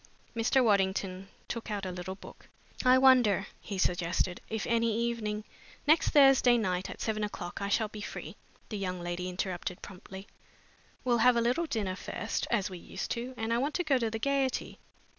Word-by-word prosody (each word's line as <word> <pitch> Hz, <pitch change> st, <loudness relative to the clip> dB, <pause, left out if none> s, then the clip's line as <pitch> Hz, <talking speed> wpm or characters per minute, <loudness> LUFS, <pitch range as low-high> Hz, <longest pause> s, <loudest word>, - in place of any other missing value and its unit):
Mr. 245 Hz, +3 st, +3 dB
Waddington 195 Hz, -3 st, +1 dB, 0.2 s
took 230 Hz, 0 st, -5 dB
out 205 Hz, -2 st, -3 dB
a 185 Hz, -, -3 dB
little 180 Hz, +1 st, -5 dB
book. -, -, -14 dB, 0.3 s
"I 255 Hz, 0 st, +6 dB
wonder," 250 Hz, -7 st, +5 dB
he 200 Hz, -, -6 dB
suggested, 180 Hz, 0 st, 0 dB
"if 220 Hz, -1 st, -2 dB
any 230 Hz, 0 st, +2 dB
evening 225 Hz, -3 st, -2 dB, 0.2 s
" -, -, -23 dB
"Next 310 Hz, +2 st, +5 dB
Thursday 270 Hz, -4 st, +6 dB
night 185 Hz, -4 st, -1 dB
at -, -, -8 dB
seven 215 Hz, -1 st, -1 dB
o'clock, 190 Hz, -4 st, -5 dB
I 200 Hz, -, -2 dB
shall 220 Hz, +2 st, +2 dB
be 210 Hz, 0 st, -9 dB
free," -, -, -7 dB, 0.3 s
the 210 Hz, -, -4 dB
young 185 Hz, -2 st, -3 dB
lady 175 Hz, +1 st, -3 dB
interrupted 180 Hz, -1 st, -4 dB
promptly. 190 Hz, 0 st, -10 dB, 0.8 s
"We'll 240 Hz, -2 st, +2 dB
have 245 Hz, +2 st, +6 dB
a 235 Hz, -, +3 dB
little 250 Hz, +9 st, +1 dB
dinner 210 Hz, -9 st, -2 dB
first, -, -, -3 dB
as 210 Hz, -5 st, +1 dB
we 185 Hz, -2 st, -8 dB
used -, -, -6 dB
to, 250 Hz, +2 st, -3 dB
and 225 Hz, 0 st, -1 dB
I 235 Hz, -, +2 dB
want 285 Hz, +3 st, -1 dB
to 355 Hz, -, +1 dB
go 280 Hz, -5 st, +2 dB
to 230 Hz, -2 st, 0 dB
the 225 Hz, -, -3 dB
Gaiety. 270 Hz, +2 st, -1 dB
215 Hz, 190 wpm, -30 LUFS, 190-245 Hz, 0.8 s, I